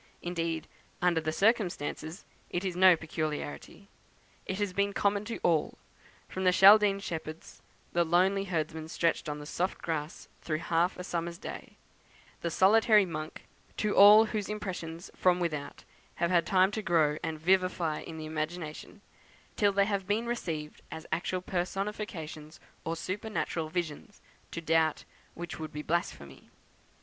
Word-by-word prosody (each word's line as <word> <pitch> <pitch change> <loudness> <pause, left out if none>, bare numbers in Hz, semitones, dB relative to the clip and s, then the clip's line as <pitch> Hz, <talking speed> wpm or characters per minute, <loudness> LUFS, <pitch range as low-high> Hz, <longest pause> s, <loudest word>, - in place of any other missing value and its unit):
Indeed, 165 -2 -2 0.3
under 175 -2 +2
the 155 0 -1
circumstances, 180 -4 0 0.2
it 175 +2 -2
is 185 -2 -2
no 185 0 +7
peculiarity. 155 +4 -5 0.6
It 190 - -2
has 205 -2 -1
been 200 +1 0
common 200 +1 +1
to 230 - -4
all, 165 -3 +1 0.5
from 190 - -4
the 185 - +5
Chaldean 200 +1 +7
shepherds 160 -4 -7 0.3
"the 175 - +3
lonely 185 +4 +2
herdsman 160 -3 -3
stretched 165 -1 0
on 150 - -3
the 150 - -8
soft 180 +5 -2
grass 155 -1 -4
through 155 -2 -2
half 170 +3 0
a 180 - -5
summer's 170 -1 -3
day" 205 - -9 0.6
the 170 - -1
solitary 210 +3 +5
monk 155 -3 -6 0.3
to 210 -1 0
all 210 +2 +9
whose 210 -2 -3
impressions 180 -5 -5
from 180 -1 +3
without 155 -5 -3 0.3
have 170 +1 0
had 170 -3 +3
time 190 0 +4
to 220 - -3
grow 160 -6 +2
and 155 -1 -4
vivify 180 -2 +1
in 160 - -8
the 155 - -6
imagination, 155 0 -5 0.5
till 205 -1 +3
they 200 0 +3
have 200 -2 -2
been 215 +3 0
received 165 -11 -4
as 160 0 -8
actual 180 +2 -1
personifications, 180 -4 -4 0.2
or 165 - -2
supernatural 185 -3 -3
visions, 175 +5 -4 0.3
to 170 - -6
doubt 160 -1 +2 0.3
which 175 -1 -6
would 155 -1 -6
be 150 0 -6
blasphemy. 110 - -3
175 Hz, 150 wpm, -30 LUFS, 160-195 Hz, 0.6 s, all